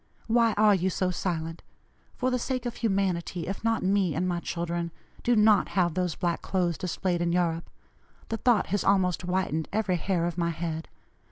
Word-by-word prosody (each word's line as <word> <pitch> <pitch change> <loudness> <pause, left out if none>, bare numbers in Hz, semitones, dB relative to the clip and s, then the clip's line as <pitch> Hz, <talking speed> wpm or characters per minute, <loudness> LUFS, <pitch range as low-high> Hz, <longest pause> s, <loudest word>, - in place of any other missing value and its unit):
Why 230 -1 +3
are 210 0 +5
you 190 -1 +1
so 185 0 0
silent? 165 -2 -3 0.5
For 255 0 0
the 250 - +1
sake 255 0 -2
of 240 - -4
humanity, 185 -5 -1
if 195 +3 -5
not 225 0 +1
me 190 -4 +2
and 180 +3 0
my 175 -1 0
children, 170 0 -3 0.3
do 240 - +2
not 210 -1 +5
have 175 -3 +3
those 180 -2 -1
black 175 -1 -1
clothes 175 -4 -1
displayed 180 -1 -1
in 170 0 +1
Europe. 170 -1 0 0.6
The 225 - -1
thought 235 -4 +3
has 205 - +1
almost 190 -3 +2
whitened 180 -3 -1
every 205 -4 +1
hair 175 0 0
of 175 0 -3
my 170 0 +1
head. 165 -1 -4
180 Hz, 185 wpm, -27 LUFS, 170-205 Hz, 0.6 s, are